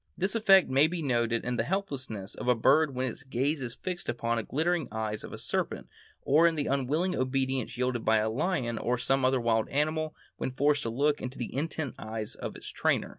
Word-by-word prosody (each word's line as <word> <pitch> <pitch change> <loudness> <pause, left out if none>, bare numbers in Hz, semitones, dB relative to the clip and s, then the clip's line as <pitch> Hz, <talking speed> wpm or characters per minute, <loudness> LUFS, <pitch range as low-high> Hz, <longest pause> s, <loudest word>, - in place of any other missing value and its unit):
This 190 +2 +1
effect 200 -4 +6
may 135 +4 +4
be 170 0 -4
noted 120 -3 +1
in 125 0 -1
the - - +2
helplessness 130 - -3
of - - -6
a 125 - +5
bird 140 +5 +3
when 130 +1 0
its 140 +5 -5
gaze 135 +2 -1
is 120 -2 -5
fixed 180 -1 -5
upon 115 0 -1
the - - 0
glittering 160 +4 0
eyes 110 -1 -3
of - - -8
a - - -6
serpent, - - -2 0.4
or 155 +5 +5
in 165 - +1
the 145 -2 -1
unwilling 145 +7 0
obedience 130 -1 -1
yielded 125 -2 -1
by 110 0 +4
a 110 0 +1
lion 120 -2 -1
or 125 +1 0
some 135 +2 +1
other 130 0 +3
wild 115 -2 +1
animal 155 +2 0 0.2
when - - -2
forced 145 +2 +2
to 115 - -2
look 145 +5 +1
into 125 +1 -5
the 120 - -5
intent 150 -1 -2
eyes 110 -1 -5
of - - -6
its - - -7
trainer. - - 0
130 Hz, 220 wpm, -29 LUFS, 120-155 Hz, 0.4 s, effect